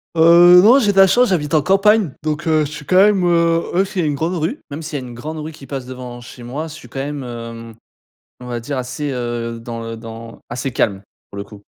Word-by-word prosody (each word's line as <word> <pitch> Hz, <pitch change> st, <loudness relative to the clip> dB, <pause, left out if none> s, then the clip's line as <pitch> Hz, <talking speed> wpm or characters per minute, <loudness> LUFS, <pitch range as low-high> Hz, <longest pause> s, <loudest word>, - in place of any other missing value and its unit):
Heu, 170 Hz, +2 st, +7 dB
non, 240 Hz, +6 st, +7 dB
j'ai 210 Hz, -6 st, +2 dB
de -, -, -7 dB
la 195 Hz, -, +9 dB
chance, 245 Hz, +5 st, +3 dB
j'habite 150 Hz, -5 st, -1 dB
en 155 Hz, -, +4 dB
campagne, 195 Hz, +1 st, +3 dB
donc 155 Hz, +1 st, -3 dB
heu, 155 Hz, -1 st, +3 dB
je 145 Hz, -, -7 dB
suis 150 Hz, 0 st, -9 dB
quand 185 Hz, -, 0 dB
même, 195 Hz, 0 st, +5 dB
heu, 170 Hz, -1 st, +3 dB
ouais, 190 Hz, +2 st, +3 dB
c'est 195 Hz, -1 st, -5 dB
une 150 Hz, -4 st, 0 dB
grande 165 Hz, +5 st, -2 dB
rue. 170 Hz, -, -2 dB
Même 145 Hz, +3 st, -5 dB
s'il 150 Hz, -2 st, -5 dB
y -, -, -8 dB
a -, -, -8 dB
une 120 Hz, -, -10 dB
grande 150 Hz, +7 st, -7 dB
rue 155 Hz, +1 st, -6 dB
qui 145 Hz, -3 st, -14 dB
passe 135 Hz, -1 st, -5 dB
devant 125 Hz, -1 st, -8 dB
chez 120 Hz, 0 st, -12 dB
moi, 140 Hz, +7 st, -5 dB
je 155 Hz, -, -10 dB
suis 155 Hz, -, -12 dB
quand 135 Hz, -, -6 dB
même, 145 Hz, 0 st, -4 dB
hem, 115 Hz, -2 st, -8 dB, 0.6 s
on 125 Hz, -, -10 dB
va 120 Hz, -1 st, -4 dB
dire 135 Hz, +4 st, -5 dB
assez, 130 Hz, +3 st, -4 dB
heu, 120 Hz, -2 st, -4 dB
dans 115 Hz, 0 st, -7 dB
le 115 Hz, 0 st, -6 dB
dans 115 Hz, 0 st, -10 dB
assez 125 Hz, +2 st, -4 dB
calme, 100 Hz, -4 st, -1 dB, 0.3 s
pour 100 Hz, -, -10 dB
le 100 Hz, -, -4 dB
coup. 100 Hz, 0 st, -14 dB
145 Hz, 260 wpm, -18 LUFS, 120-170 Hz, 0.6 s, la